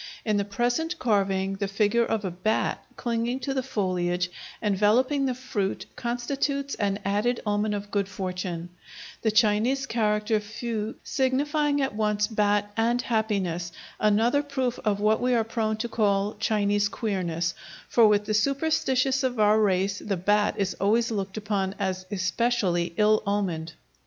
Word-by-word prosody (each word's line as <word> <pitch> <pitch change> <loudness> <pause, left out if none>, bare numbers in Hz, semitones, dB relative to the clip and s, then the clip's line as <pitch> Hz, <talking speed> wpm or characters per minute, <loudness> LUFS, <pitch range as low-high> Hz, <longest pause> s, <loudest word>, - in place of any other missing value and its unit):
In 215 -2 +2
the 200 - 0
present 245 - -1
carving 195 -5 +1
the 200 0 -1
figure 210 +4 +2
of 215 -2 -1
a 185 - -2
bat 185 +5 -1
clinging 235 +1 -1
to 270 +2 -2
the 265 - 0
foliage 180 -7 -1 0.3
enveloping 230 +7 +2
the 255 - -1
fruit 240 -6 -3
constitutes 275 +3 -2
an 200 -2 0
added 210 +5 +1
omen 210 0 0
of 205 0 -6
good 200 -1 0
fortune, 180 -3 -4 0.5
the 220 - +2
Chinese 220 +5 +2
character 210 -1 +1
fu 220 +1 -4
signifying 285 +2 +1
at 270 - -1
once 210 -1 +1
"bat" 205 -1 +1
and 235 +2 +2
"happiness," 195 -8 -1 0.3
another 225 +6 +3
proof 265 -4 -2
of 205 -2 +1
what 215 +1 +2
we 250 0 +2
are 230 - +3
prone 220 -1 -1
to 235 +2 -2
call 205 -2 +1
Chinese 205 -2 +1
queerness, 175 -6 -2 0.3
for 230 -2 +5
with 210 0 +3
the 215 - -1
superstitious 270 +2 +1
of 250 -3 -1
our 215 +1 +5
race 195 0 +1
the 200 -3 -2
bat 205 +4 +2
is 195 -2 0
always 230 +4 +2
looked 195 -1 -3
upon 200 -2 -1
as 185 -2 -3
especially 185 -2 0
ill 215 0 +4
omened. 175 -6 -1
210 Hz, 150 wpm, -26 LUFS, 200-240 Hz, 0.5 s, for